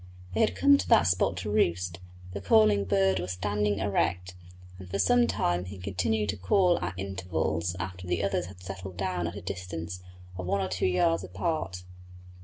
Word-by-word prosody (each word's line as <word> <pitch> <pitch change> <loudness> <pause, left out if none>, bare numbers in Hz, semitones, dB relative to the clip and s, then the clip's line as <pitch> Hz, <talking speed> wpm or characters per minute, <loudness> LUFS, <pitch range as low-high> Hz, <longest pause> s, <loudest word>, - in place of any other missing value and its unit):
They - - -1
had 90 - +3
come 95 0 +5
to 90 -2 -4
that - - +6
spot 90 0 +2
to 105 +4 -3
roost; 90 -4 +1 0.3
the 100 - -5
calling 100 0 +4
bird 95 -1 +2
was 90 +1 -3
standing 105 +2 0
erect, 90 -2 0 0.5
and 95 -1 -10
for 100 - -2
some 120 +5 +4
time 90 -4 0
he 95 +2 -8
continued 100 +3 -1
to 105 - -1
call 175 - +3
at 90 +1 -4
intervals 90 -3 -2
after 90 0 -6
the 90 0 0
others 95 -3 0
had 90 0 -13
settled 95 -1 -7
down 90 -2 -1
at 85 - -6
a 100 - -6
distance 90 -2 -5 0.4
of 90 - -4
one 100 - +1
or 95 -1 -1
two 95 0 0
yards 90 -1 +2
apart. 95 - -3
95 Hz, 190 wpm, -28 LUFS, 90-100 Hz, 0.5 s, that